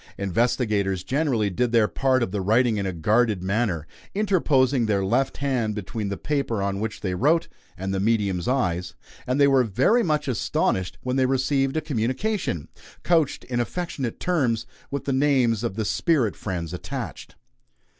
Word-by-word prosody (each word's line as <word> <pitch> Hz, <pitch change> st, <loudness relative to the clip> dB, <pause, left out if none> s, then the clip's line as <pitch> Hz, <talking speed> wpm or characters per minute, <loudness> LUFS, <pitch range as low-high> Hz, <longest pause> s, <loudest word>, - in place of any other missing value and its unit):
Investigators 100 Hz, -2 st, 0 dB
generally 130 Hz, -7 st, 0 dB
did 120 Hz, +6 st, 0 dB
their 115 Hz, -3 st, +4 dB
part 130 Hz, 0 st, +1 dB
of 95 Hz, -, -3 dB
the 100 Hz, -1 st, -2 dB
writing 110 Hz, +3 st, +3 dB
in 100 Hz, -1 st, -1 dB
a -, -, -1 dB
guarded 105 Hz, +3 st, +1 dB
manner, 95 Hz, -5 st, 0 dB, 0.3 s
interposing 145 Hz, -, +2 dB
their 100 Hz, -2 st, +1 dB
left 125 Hz, +7 st, +1 dB
hand 125 Hz, -7 st, -1 dB
between 105 Hz, +1 st, -4 dB
the 100 Hz, -, -3 dB
paper 140 Hz, -7 st, -1 dB
on 100 Hz, 0 st, -1 dB
which 110 Hz, 0 st, -4 dB
they 95 Hz, -2 st, -2 dB
wrote 155 Hz, -, +2 dB, 0.3 s
and 95 Hz, +1 st, -3 dB
the 95 Hz, -, 0 dB
medium's 100 Hz, -4 st, 0 dB
eyes; 90 Hz, -9 st, 0 dB, 0.3 s
and 130 Hz, +3 st, 0 dB
they 140 Hz, -, +6 dB
were 135 Hz, -2 st, +4 dB
very 165 Hz, -, +3 dB
much 155 Hz, -6 st, 0 dB
astonished 95 Hz, -6 st, 0 dB
when 125 Hz, +1 st, -1 dB
they 130 Hz, -1 st, +3 dB
received 135 Hz, +2 st, +1 dB
a -, -, +1 dB
communication, 130 Hz, -, -2 dB, 0.4 s
couched 165 Hz, -5 st, +2 dB
in 120 Hz, -1 st, -3 dB
affectionate 135 Hz, -2 st, -3 dB
terms, 130 Hz, -11 st, 0 dB, 0.2 s
with 140 Hz, -, -4 dB
the 140 Hz, -, 0 dB
names 130 Hz, -5 st, +2 dB
of 115 Hz, -5 st, -2 dB
their 110 Hz, -1 st, -2 dB
spirit 125 Hz, -, +1 dB
friends 85 Hz, -5 st, -4 dB
attached. 90 Hz, -, -6 dB
120 Hz, 165 wpm, -24 LUFS, 100-135 Hz, 0.4 s, they